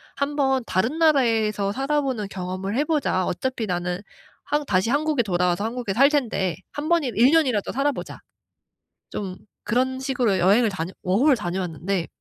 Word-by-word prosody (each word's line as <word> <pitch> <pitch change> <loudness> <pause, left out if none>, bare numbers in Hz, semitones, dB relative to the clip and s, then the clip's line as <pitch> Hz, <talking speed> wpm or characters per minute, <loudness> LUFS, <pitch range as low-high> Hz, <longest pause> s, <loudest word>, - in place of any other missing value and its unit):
1 280 +1 -2
번 265 -3 +1
다른 225 +11 0
나라에서 225 -9 +2
살아보는 270 -4 -1
경험을 190 +3 -4
해 290 - +3
보자. 280 - 0
어차피 250 +4 -2
나는 180 -1 -2 0.4
한 295 0 -1
다시 190 +4 +1
한국에 295 -2 +1
돌아와서 180 -1 0
한국에 230 -2 -3
살 275 +7 +5
텐데 225 - 0 0.2
1 290 +1 -5
번 340 -2 +3
1 245 +1 +3
년이라도 265 -11 +2
살아보자.' 280 +2 -2 0.9
좀 190 -3 -5 0.3
그런 260 +3 0
식으로 250 -7 0
여행을 205 +6 +4
다녀 185 -1 -4
워홀을 250 +10 +3
다녀왔는데. 180 -2 -3
230 Hz, 325 characters per minute, -23 LUFS, 190-275 Hz, 0.9 s, 살